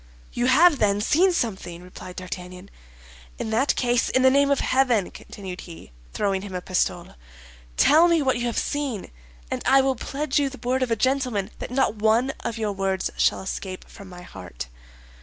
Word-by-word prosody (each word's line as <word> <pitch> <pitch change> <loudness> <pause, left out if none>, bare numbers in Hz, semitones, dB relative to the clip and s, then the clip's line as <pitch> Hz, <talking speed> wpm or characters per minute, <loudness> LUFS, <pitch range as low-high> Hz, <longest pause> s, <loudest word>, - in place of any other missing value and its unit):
"You 240 +1 0
have, 300 +4 +5
then, 205 -1 +2
seen 330 - +3
something?" 190 - -3
replied 180 0 -10
D'Artagnan. 180 +1 -8 0.7
"In 220 - -4
that 255 +6 +2
case, 245 -1 +1
in 260 - +2
the 260 - +6
name 280 +1 +4
of 280 - +2
heaven," 250 -7 +2
continued 190 -3 -9
he, 165 - -12 0.2
throwing 195 - -1
him 195 -2 -7
a - - -1
pistole, 185 0 -1 0.6
"tell 320 +4 +6
me 335 -1 +3
what 260 -3 +1
you 240 - -1
have 235 - -3
seen, 280 -8 -2 0.4
and - - -2
I 270 +1 +5
will 265 0 +1
pledge 280 +4 -1
you 280 -1 +1
the 265 - -10
word 260 +1 +1
of 255 - 0
a 230 - +2
gentleman 250 -4 0
that - - -5
not 250 -3 +1
one 225 +5 +2
of 230 - -4
your 215 -2 -1
words 195 -1 -1
shall - - +1
escape 190 -1 -6
from 200 -3 -13
my 180 -1 -11
heart." 85 - -9
230 Hz, 190 wpm, -24 LUFS, 190-270 Hz, 0.7 s, the